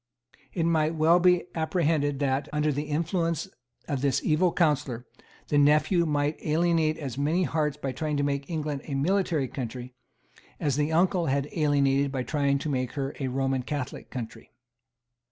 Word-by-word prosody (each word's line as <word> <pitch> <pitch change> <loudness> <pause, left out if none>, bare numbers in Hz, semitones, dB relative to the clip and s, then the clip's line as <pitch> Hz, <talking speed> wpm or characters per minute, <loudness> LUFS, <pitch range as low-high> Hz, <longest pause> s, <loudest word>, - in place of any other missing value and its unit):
It 170 - -1
might 160 -1 +1
well 160 +3 +4
be 180 0 +4
apprehended 160 -3 0
that, 135 0 -1
under 150 0 +1
the 145 +2 -2
influence 165 +1 -1 0.4
of 140 -4 -2
this 140 -2 +2
evil 170 +3 +2
counsellor, 145 -8 0 0.4
the 145 - +3
nephew 155 +4 +3
might 145 0 -1
alienate 160 0 +2
as 135 -4 -5
many 160 +6 +1
hearts 150 -3 -1
by 140 -3 -3
trying 150 +3 -2
to 145 - +1
make 140 +1 -2
England 150 -4 -3
a 140 - -4
military 160 -1 +1
country 125 0 -6 0.7
as 145 -3 0
the 150 +2 0
uncle 175 +1 +2
had 140 +1 0
alienated 140 -2 +2
by 130 -2 -2
trying 140 0 +1
to 140 - -5
make 130 -3 -2
her 140 -1 -3
a 135 - -1
Roman 135 0 0
Catholic 140 0 -5
country. 120 -3 -7
150 Hz, 165 wpm, -27 LUFS, 135-160 Hz, 0.7 s, well